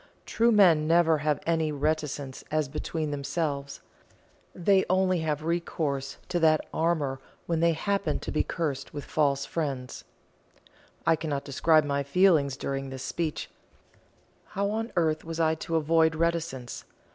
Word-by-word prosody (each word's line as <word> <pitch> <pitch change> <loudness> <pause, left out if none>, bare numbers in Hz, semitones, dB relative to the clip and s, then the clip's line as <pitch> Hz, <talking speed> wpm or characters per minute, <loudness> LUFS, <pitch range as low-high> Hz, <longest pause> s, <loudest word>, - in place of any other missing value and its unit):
True 235 +1 +2
men 175 -8 +5
never 165 -1 +4
have 150 -1 0
any 160 -2 +1
reticence 150 -2 -2
as 155 -2 0
between 155 +2 -3
themselves; 140 0 -3 0.7
they 190 +2 +3
only 185 -1 +2
have 155 -2 -2
recourse 155 -5 -2
to 175 - 0
that 155 -2 +4
armour 155 -5 0 0.3
when 165 -2 0
they 170 0 +3
happen 195 -1 -1
to - - -5
be - - +1
cursed 150 -5 -3
with 145 - -5
false 140 -3 +1
friends." 135 -6 -4 1.0
I 165 - +5
cannot 150 -3 -3
describe 155 +3 +3
my 140 -1 0
feelings 140 -2 +3
during 135 0 -3
this 130 -1 -7
speech. 160 +2 -3 1.0
How 200 +1 -2
on 225 +2 -3
earth 160 -3 +1
was 165 0 -6
I 160 -1 +3
to 165 +1 -4
avoid 160 +1 +3
reticence? 165 -7 -2
155 Hz, 145 wpm, -27 LUFS, 140-170 Hz, 1.0 s, men